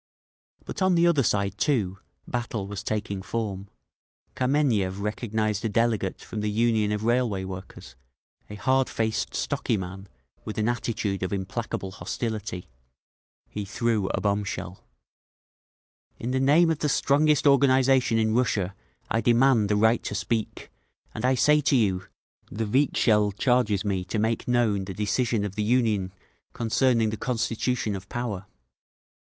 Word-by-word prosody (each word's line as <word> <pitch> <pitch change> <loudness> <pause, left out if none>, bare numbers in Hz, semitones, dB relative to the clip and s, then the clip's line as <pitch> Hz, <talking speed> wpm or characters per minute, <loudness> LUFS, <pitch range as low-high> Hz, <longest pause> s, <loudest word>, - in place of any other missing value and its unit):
But - - -6
on 185 -1 +4
the 170 0 +4
other 170 -5 +4
side, 100 -4 0
too, 100 -10 0 0.3
battle 120 -4 -3
was 100 0 -6
taking 105 -3 -3
form. 100 -2 -4 0.7
Kameniev 125 -8 +1
recognised 110 0 -2
a 115 - 0
delegate 110 -3 0
from 110 - -6
the 105 - -1
Union 110 -1 +1
of 105 0 -2
Railway 115 -4 +1
Workers, 95 -9 -9 0.5
a 105 - -7
hardfaced, 115 -2 0
stocky 115 - -1
man 95 +1 -7 0.3
with 110 - -6
an 110 0 +1
attitude 115 -5 -2
of 95 - -2
implacable 95 0 -4
hostility. 105 -2 -4 0.8
He 105 - -5
threw 105 0 0
a - - -1
bombshell. 100 -3 -2 1.3
"In 120 - -4
the 130 - +1
name 155 +5 +4
of 155 - -2
the 150 - 0
strongest 150 +2 +3
organisation 135 -3 +4
in 110 -1 +2
Russia 105 -6 +1 0.4
I 115 - +2
demand 120 -3 +4
the 105 - +2
right 110 +3 +3
to 105 - -3
speak, 110 +2 -3 0.4
and - - -6
I 130 +1 +3
say 150 +4 +4
to 140 - +2
you: 95 -6 +1 0.4
the 110 +2 -3
Vikzhel 105 -4 +2
charges 110 -3 +1
me 95 -3 -1
to 100 - -3
make 110 +1 0
known 115 -5 +1
the 95 -1 -7
decision 105 +1 0
of 100 - -5
the 105 - -3
Union 105 -4 +1 0.4
concerning 115 -1 +2
the 110 - -4
constitution 115 -2 -1
of 95 +1 -9
Power. 105 -6 -4
110 Hz, 145 wpm, -26 LUFS, 100-125 Hz, 1.3 s, on